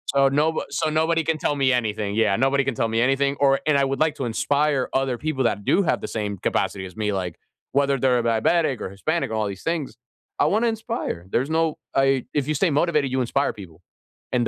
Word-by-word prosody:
So 135 Hz, 0 st, +5 dB
no 150 Hz, +4 st, +1 dB
so 140 Hz, +3 st, -1 dB
nobody 160 Hz, +1 st, +1 dB
can 160 Hz, 0 st, 0 dB
tell 145 Hz, -, -1 dB
me 135 Hz, -2 st, +2 dB
anything. 105 Hz, -4 st, -1 dB
Yeah, 110 Hz, -3 st, +3 dB
nobody 135 Hz, +2 st, +2 dB
can 135 Hz, -1 st, -1 dB
tell 115 Hz, -, 0 dB
me 115 Hz, +1 st, 0 dB
anything. 135 Hz, +2 st, +2 dB
Or 135 Hz, -1 st, +4 dB
and 150 Hz, -2 st, +4 dB
I 140 Hz, -, +3 dB
would 135 Hz, 0 st, -2 dB
like 155 Hz, -1 st, +2 dB
to 135 Hz, -, -3 dB
inspire 140 Hz, +3 st, 0 dB
other 135 Hz, -2 st, 0 dB
people 145 Hz, -1 st, -2 dB
that 100 Hz, -3 st, -1 dB
do 200 Hz, -, +3 dB
have -, -, +1 dB
the -, -, -4 dB
same 105 Hz, -3 st, -3 dB
capacity 95 Hz, +2 st, -1 dB
as 90 Hz, -2 st, -11 dB
me, 105 Hz, -1 st, -1 dB
like, 90 Hz, -3 st, -3 dB, 0.4 s
whether 140 Hz, -1 st, +2 dB
they're 125 Hz, -1 st, +3 dB
a -, -, -1 dB
diabetic 120 Hz, +5 st, +1 dB
or -, -, -4 dB
Hispanic 155 Hz, -, -2 dB
or 110 Hz, -, -5 dB
all 110 Hz, -1 st, 0 dB
these 100 Hz, -1 st, -7 dB
things. 165 Hz, -4 st, -2 dB, 0.4 s
I -, -, +4 dB
want 215 Hz, +4 st, +2 dB
to -, -, +3 dB
inspire. 225 Hz, -, -4 dB
There's 130 Hz, +8 st, 0 dB
no 160 Hz, -1 st, +1 dB, 0.2 s
I 135 Hz, -1 st, +2 dB
if 145 Hz, -2 st, 0 dB
you 155 Hz, -, 0 dB
stay 170 Hz, +2 st, +2 dB
motivated, 150 Hz, -2 st, +1 dB
you 130 Hz, 0 st, 0 dB
inspire 135 Hz, +3 st, 0 dB
people. 90 Hz, -5 st, -12 dB, 0.5 s
And 120 Hz, -2 st, +1 dB
135 Hz, 235 wpm, -23 LUFS, 115-150 Hz, 0.5 s, So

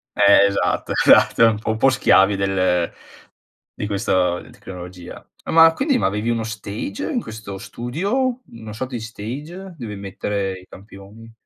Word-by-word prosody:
Eh, 100 Hz, 0 st, +6 dB
esatto, 100 Hz, 0 st, -1 dB
esatto 115 Hz, -, +5 dB
un 110 Hz, -2 st, 0 dB
po' 110 Hz, -, -5 dB
un 110 Hz, -, 0 dB
po' 135 Hz, +4 st, +4 dB
schiavi 100 Hz, -5 st, +4 dB
del 95 Hz, -3 st, 0 dB, 0.8 s
di 105 Hz, -, -5 dB
questo 95 Hz, -4 st, 0 dB
tecnologia. 90 Hz, -1 st, -10 dB, 0.2 s
Ma 165 Hz, 0 st, +6 dB
quindi 270 Hz, -, +1 dB
ma -, -, +1 dB
avevi 105 Hz, +4 st, -2 dB
uno 115 Hz, -1 st, 0 dB
stage 110 Hz, -, -5 dB
in 245 Hz, -6 st, -1 dB
questo 105 Hz, -3 st, -8 dB
studio? 205 Hz, -, -2 dB
Una 110 Hz, -2 st, -10 dB
sorta 130 Hz, +3 st, -5 dB
di -, -, -3 dB
stage, 145 Hz, -, -8 dB
dove 110 Hz, -5 st, -6 dB
mettere 100 Hz, 0 st, -4 dB
i 90 Hz, -, -17 dB
campioni? 105 Hz, +3 st, -14 dB
110 Hz, 150 wpm, -21 LUFS, 100-125 Hz, 0.8 s, Eh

